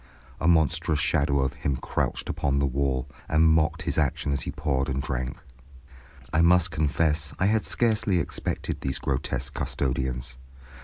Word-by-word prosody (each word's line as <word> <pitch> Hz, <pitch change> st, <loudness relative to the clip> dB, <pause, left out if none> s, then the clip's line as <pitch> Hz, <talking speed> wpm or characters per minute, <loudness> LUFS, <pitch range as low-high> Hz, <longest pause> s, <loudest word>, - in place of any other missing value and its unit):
A 80 Hz, -, 0 dB
monstrous 80 Hz, -2 st, +3 dB
shadow 70 Hz, -2 st, +2 dB
of 65 Hz, +1 st, 0 dB
him 70 Hz, -2 st, -2 dB
crouched -, -, -2 dB
upon 70 Hz, 0 st, 0 dB
the 70 Hz, -, +2 dB
wall, 65 Hz, -1 st, -1 dB, 0.2 s
and 80 Hz, +1 st, +4 dB
mocked 80 Hz, 0 st, +2 dB
his -, -, 0 dB
action 70 Hz, -1 st, 0 dB
as 70 Hz, -2 st, 0 dB
he -, -, -4 dB
poured 70 Hz, -3 st, -1 dB
and 65 Hz, +1 st, -1 dB
drank. 65 Hz, -1 st, -3 dB, 0.9 s
I 80 Hz, -, +4 dB
must 90 Hz, 0 st, +4 dB
confess 75 Hz, 0 st, 0 dB
I 90 Hz, -, +1 dB
had 110 Hz, +2 st, +2 dB
scarcely 110 Hz, -5 st, +2 dB
expected 85 Hz, -, -3 dB
these 65 Hz, -, -2 dB
grotesque 65 Hz, -1 st, -2 dB
custodians. 65 Hz, -1 st, -2 dB
70 Hz, 155 wpm, -26 LUFS, 65-80 Hz, 0.9 s, and